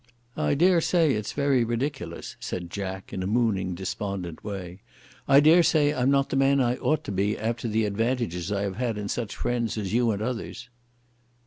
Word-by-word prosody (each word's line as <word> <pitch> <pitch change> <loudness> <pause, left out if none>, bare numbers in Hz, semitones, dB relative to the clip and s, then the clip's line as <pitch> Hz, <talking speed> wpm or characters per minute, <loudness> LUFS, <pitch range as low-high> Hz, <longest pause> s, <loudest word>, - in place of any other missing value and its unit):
"I - - +1
dare 175 +3 +4
say 165 -3 +3
it's 105 -1 -3
very 140 -4 +2
ridiculous," 120 - -4
said 85 -1 -5
Jack, 95 -1 -5
in 95 - -3
a 95 - -2
mooning 100 -5 0
despondent 95 -2 -5
way. 95 -3 -6 0.5
"I 140 0 +7
dare 160 +4 +6
say 150 -3 +3
I'm 130 +1 +1
not 140 0 +2
the - - 0
man 135 +1 +3
I 125 -1 +1
ought 155 0 0
to - - -5
be 100 +2 0
after 115 +2 -2
the 110 0 +1
advantages 105 -4 -1
I 100 -1 0
have 100 -1 -3
had 120 -3 -1
in 100 -1 -4
such 115 -4 -3
friends 120 -2 -2
as 105 -2 -3
you 120 0 +3
and 100 -2 -1
others." 115 +2 -5
115 Hz, 195 wpm, -26 LUFS, 100-135 Hz, 0.5 s, I